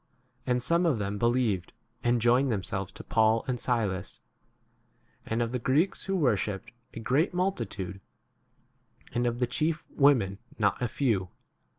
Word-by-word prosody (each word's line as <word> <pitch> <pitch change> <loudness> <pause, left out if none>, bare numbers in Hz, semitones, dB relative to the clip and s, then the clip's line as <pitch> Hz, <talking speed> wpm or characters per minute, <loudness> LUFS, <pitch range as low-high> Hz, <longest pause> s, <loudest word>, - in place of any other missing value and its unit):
And 125 -1 +1
some 170 +4 +3
of 145 -8 +2
them 100 0 -3
be 115 - +3
lieved, 115 -7 0 0.3
and 120 0 +3
joined 120 +3 +3
themselves 95 -2 -2
to - - -9
Paul 110 0 +2
and 125 -2 -1
Silas, 105 -7 -1 1.1
and 115 +1 0
of 115 - -3
the 125 - -1
Greeks 145 +10 +1
who 195 - -1
worshipped, 105 - 0 0.2
a - - -5
great 145 - +1
multi 180 - 0
tude, 95 -1 -6 1.1
and 120 0 +1
of 120 0 -1
the 125 - +2
chief 155 +6 -1
women 120 -9 +3 0.2
not 100 -2 +1
5 - - -19
a 120 - +1
few. 110 -7 0
120 Hz, 165 wpm, -28 LUFS, 105-135 Hz, 1.1 s, some